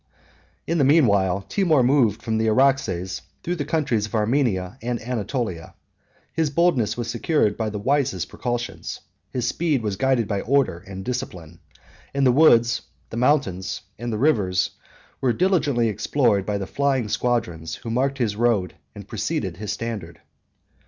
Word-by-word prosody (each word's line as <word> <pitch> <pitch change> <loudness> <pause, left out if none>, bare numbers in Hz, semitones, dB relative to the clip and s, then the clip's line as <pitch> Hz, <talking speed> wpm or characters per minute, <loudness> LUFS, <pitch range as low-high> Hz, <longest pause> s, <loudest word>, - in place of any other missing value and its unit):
In 165 0 0
the - - +4
mean 145 +2 +5
while, 100 -2 +2
Timour 155 - +2
moved 120 -5 +3
from 110 -1 0
the 110 - +1
Araxes 110 -8 +1 0.2
through 175 +1 -2
the 145 - -2
countries 140 -9 0
of 105 - -6
Armenia 110 -2 0
and 120 0 -2
Anatolia: 115 -6 -3 0.6
his 160 -2 +1
boldness 140 -9 +2
was 120 -2 -3
secured 120 -4 +1
by 110 -1 -2
the 105 - -5
wisest 135 +5 0
precautions; 120 0 -4 0.3
his 125 -2 -2
speed 150 -3 0
was 100 -3 -2
guided 130 -2 +2
by 100 -2 -1
order 130 -9 +1
and 95 -1 -7
discipline; 90 -10 -5 0.6
and 140 -1 +2
the 125 - +6
woods, 120 -5 +5 0.3
the 115 - -5
mountains, 100 -9 +1 0.2
and 120 +1 -3
the 110 - -2
rivers, 100 -9 +2 0.5
were 125 -3 +2
diligently 145 - +2
explored 105 -2 +1
by 105 -1 0
the 100 - -3
flying 135 +1 0
squadrons, 85 -10 -1
who 115 - -7
marked 135 +3 0
his 115 -5 0
road 110 -5 +1 0.2
and - - -10
preceded 90 -4 -3
his 105 +1 -4
standard. 105 -6 -5
120 Hz, 160 wpm, -23 LUFS, 100-135 Hz, 0.6 s, the